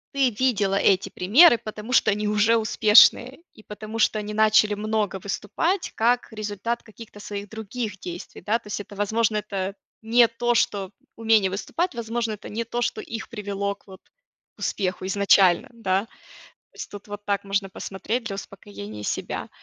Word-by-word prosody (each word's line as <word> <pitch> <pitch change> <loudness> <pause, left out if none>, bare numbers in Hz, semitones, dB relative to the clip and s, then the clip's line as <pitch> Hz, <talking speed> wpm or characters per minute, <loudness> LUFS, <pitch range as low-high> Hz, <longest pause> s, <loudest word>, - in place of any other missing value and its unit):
ты 270 -2 +3
видела 210 -7 +2
эти 195 -1 +2
примеры, 240 - +6
потому 215 +2 -7
что 255 - +4
они 210 +1 -1
уже 210 +2 +3
успешные, 225 +3 +5 0.2
и - - -15
потому 215 +1 -7
что 215 - +2
они 210 0 -5
начали 215 -1 +4
много 215 0 0
выступать, 325 - -2
как 240 +2 +1
результат 215 +2 -4
каких-то 215 -1 -13
своих 205 -1 -7
других 220 -2 -5
действий, 175 0 -8
да. 225 +3 +1
То - - -17
есть 205 - -4
это 205 - -12
возможно 215 +2 0
это 195 -1 -3 0.3
не 235 +1 +5
то, 240 +1 -1
что 200 -4 0 0.2
умение 220 -4 +3
выступать, 305 - -3
возможно 230 -1 -2
это 210 - -9
не 225 +3 -3
то, 240 +1 -4
что - - -1
их 225 -1 -7
привело 200 -2 -3
к - - -33
вот 190 -1 -13 0.5
к - - -27
успеху 185 -2 -2
изначально, 195 -2 +4
да. 195 -4 0 0.5
То - - -43
есть - - -7
тут 205 0 -11
вот 205 0 -8
так 200 -1 -1
можно 195 0 -1
посмотреть 215 +6 -4
для 200 - -4
успокоения 105 - -9
себя. - - -3
210 Hz, 170 wpm, -24 LUFS, 200-230 Hz, 0.5 s, примеры